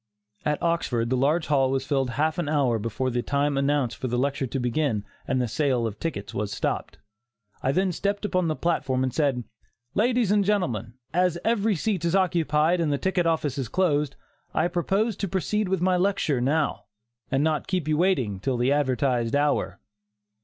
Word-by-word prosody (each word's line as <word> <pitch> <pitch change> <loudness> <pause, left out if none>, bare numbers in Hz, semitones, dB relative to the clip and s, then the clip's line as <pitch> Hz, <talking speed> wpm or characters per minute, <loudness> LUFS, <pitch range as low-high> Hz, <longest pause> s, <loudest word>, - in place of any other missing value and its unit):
At 150 0 +1
Oxford 125 -9 0
the - - +3
large 150 +6 +2
hall 135 -2 +2
was 135 0 -1
filled 135 -3 0
half 155 +7 0
an 160 -4 -1
hour 135 -7 +2
before 115 +4 -2
the 120 0 0
time 140 +2 0
announced 140 -3 +1
for 130 - -3
the 120 0 -1
lecture 135 +1 0
to 135 - -3
begin 125 -3 0 0.2
and 130 - +1
the 125 - 0
sale 130 -1 +1
of 110 -2 -4
tickets 105 -12 -4
was 105 0 -2
stopped. - - -3 0.6
I 135 - +1
then 185 +5 +1
stepped 200 +4 -2
upon 185 -4 +1
the 155 - 0
platform, 135 -7 0
and 130 -2 -1
said: 140 -5 +1 0.5
"Ladies 235 -1 +2
and 205 -1 +4
Gentlemen: 125 - -1 0.2
As 180 0 +2
every 220 -2 +2
seat 190 0 -1
is 170 +2 +1
occupied 170 -2 +2
and 155 -3 +1
the 140 - +1
ticket 180 +1 0
office 150 -4 0
is 125 -5 -3
closed, 150 -5 +1 0.4
I - - +3
propose 195 +5 0
to 200 - -2
proceed 195 +2 -1
with 190 -2 0
my 185 0 +3
lecture 180 -8 +1
now, 145 +3 0 0.5
and 135 +2 +2
not 155 -1 0
keep 180 -5 -1
you 155 - +2
waiting 140 - +1
till 130 +4 -1
the 125 +3 +2
advertised 130 -4 +1
hour." 145 -10 +1
145 Hz, 190 wpm, -25 LUFS, 130-180 Hz, 0.6 s, and